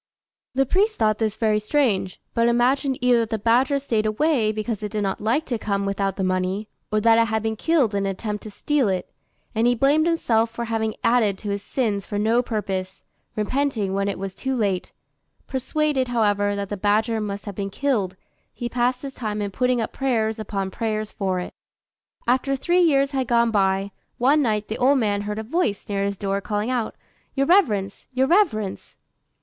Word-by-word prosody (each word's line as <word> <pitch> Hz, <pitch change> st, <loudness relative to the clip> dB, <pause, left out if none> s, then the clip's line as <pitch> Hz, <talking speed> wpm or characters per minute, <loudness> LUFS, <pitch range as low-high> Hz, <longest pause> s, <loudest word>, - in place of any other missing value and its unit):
The 270 Hz, +1 st, +3 dB
priest 410 Hz, -, +2 dB
thought 215 Hz, -1 st, +1 dB
this 220 Hz, -1 st, -1 dB
very 215 Hz, -2 st, +2 dB
strange, 215 Hz, -6 st, 0 dB
but 230 Hz, 0 st, +3 dB
imagined 255 Hz, +3 st, +2 dB
either 250 Hz, -1 st, +4 dB
that 225 Hz, -1 st, -1 dB
the 220 Hz, -, -1 dB
badger 245 Hz, +6 st, +3 dB
stayed 225 Hz, -6 st, 0 dB
away 225 Hz, -1 st, +2 dB
because 215 Hz, 0 st, -3 dB
it 210 Hz, -1 st, -4 dB
did 210 Hz, -1 st, -1 dB
not 195 Hz, -1 st, -2 dB
like 240 Hz, +9 st, +1 dB
to 240 Hz, -3 st, -2 dB
come 200 Hz, -2 st, -1 dB
without 195 Hz, -1 st, -1 dB
the 190 Hz, -, -2 dB
money, 185 Hz, +3 st, -1 dB, 0.2 s
or 215 Hz, -, +2 dB
that 225 Hz, +1 st, +5 dB
it 230 Hz, -, +4 dB
had 220 Hz, 0 st, -1 dB
been 220 Hz, 0 st, -1 dB
killed 275 Hz, -3 st, +2 dB
in 200 Hz, -1 st, 0 dB
an -, -, 0 dB
attempt 210 Hz, +2 st, -4 dB
to 215 Hz, -, -8 dB
steal 270 Hz, +2 st, 0 dB
it; 185 Hz, -1 st, -3 dB, 0.4 s
and 225 Hz, +1 st, +2 dB
he 245 Hz, -, +3 dB
blamed 290 Hz, +6 st, +3 dB
himself 230 Hz, -9 st, +2 dB
for 235 Hz, +1 st, -5 dB
having 220 Hz, -1 st, -1 dB
added 230 Hz, -4 st, +3 dB
to 205 Hz, 0 st, -4 dB
his 200 Hz, 0 st, -2 dB
sins 205 Hz, -4 st, -2 dB
for 205 Hz, -, -3 dB
no 225 Hz, +4 st, +3 dB
purpose, 195 Hz, -5 st, -4 dB, 0.3 s
repenting 220 Hz, -3 st, 0 dB
when 195 Hz, 0 st, 0 dB
it 200 Hz, -, -2 dB
was 195 Hz, 0 st, -5 dB
too 265 Hz, +6 st, -3 dB
late: 200 Hz, -6 st, -1 dB, 0.5 s
persuaded, 270 Hz, 0 st, 0 dB
however, 205 Hz, -4 st, +1 dB
that 200 Hz, -1 st, -4 dB
the 205 Hz, -, -3 dB
badger 215 Hz, +3 st, +1 dB
must 200 Hz, -1 st, -4 dB
have 205 Hz, -, -5 dB
been 195 Hz, +1 st, -4 dB
killed, 205 Hz, -6 st, -1 dB, 0.4 s
he 240 Hz, -, -5 dB
passed 245 Hz, +2 st, 0 dB
his 275 Hz, -1 st, -5 dB
time 215 Hz, -4 st, -3 dB
in 205 Hz, -1 st, -2 dB
putting 250 Hz, +3 st, +1 dB
up 225 Hz, -, -3 dB
prayers 225 Hz, -5 st, 0 dB
upon 195 Hz, -3 st, -3 dB
prayers 215 Hz, 0 st, -2 dB
for 190 Hz, -2 st, -1 dB
it. 180 Hz, -, -6 dB, 0.7 s
After 260 Hz, +3 st, +2 dB
three 345 Hz, +7 st, +2 dB
years 275 Hz, -5 st, +3 dB
had 265 Hz, -3 st, -1 dB
gone 235 Hz, 0 st, +3 dB
by, 195 Hz, -1 st, +1 dB, 0.3 s
one 280 Hz, +5 st, +4 dB
night 215 Hz, -5 st, 0 dB
the 220 Hz, -, -4 dB
old 275 Hz, +3 st, +4 dB
man 205 Hz, -4 st, +1 dB
heard 210 Hz, +1 st, -4 dB
a 220 Hz, -, -3 dB
voice 225 Hz, -, -1 dB
near 200 Hz, -1 st, -1 dB
his 200 Hz, 0 st, -2 dB
door 195 Hz, 0 st, -1 dB
calling 210 Hz, +4 st, -2 dB
out, 240 Hz, -3 st, -1 dB, 0.4 s
"Your 275 Hz, 0 st, +2 dB
reverence! 215 Hz, -, +2 dB
your 260 Hz, +1 st, +2 dB
reverence!" 265 Hz, -, +1 dB
220 Hz, 200 wpm, -23 LUFS, 205-255 Hz, 0.7 s, that